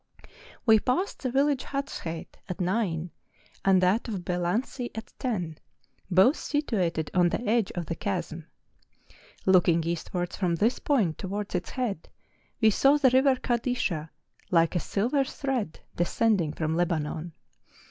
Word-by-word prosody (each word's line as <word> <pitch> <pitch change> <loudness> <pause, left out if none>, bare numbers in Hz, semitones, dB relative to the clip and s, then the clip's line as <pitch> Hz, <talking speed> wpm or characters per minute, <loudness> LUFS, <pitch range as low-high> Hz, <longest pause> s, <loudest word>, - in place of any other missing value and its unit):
We 220 -2 +7
passed 305 - -1
the 255 - -1
village 275 +1 +2
Hatsheit 275 - -5
at 180 - -4
nine, 180 -3 -1 0.5
and 190 -1 +5
that 195 +7 +2
of 195 -6 -4
Belansi 185 +8 -1
at 225 +1 -7
ten, 180 - -2 0.5
both 190 - +5
situated 185 - -1
on 175 -1 +4
the 235 +6 -3
edge 225 -2 +2
of 175 -2 -3
the 170 - -3
chasm; 170 -3 -4 1.0
looking 175 -3 +4
eastwards 170 +1 -3
from 175 -4 0
this 220 +9 +1
point 215 - +1
to¬ 190 - -5
wards 205 +1 -4
its 180 -1 -2
head, 235 - -3 0.5
we 220 -2 +5
saw 275 +7 +4
the 270 -4 +4
river 260 +1 +5
Kadisha, 235 - -1 0.4
like 165 0 +3
a - - +3
silver 245 - 0
thread 265 - -3 0.2
descending 175 -2 +1
from 155 0 -1
Lebanon. 165 -1 -1
190 Hz, 140 wpm, -27 LUFS, 170-245 Hz, 1.0 s, We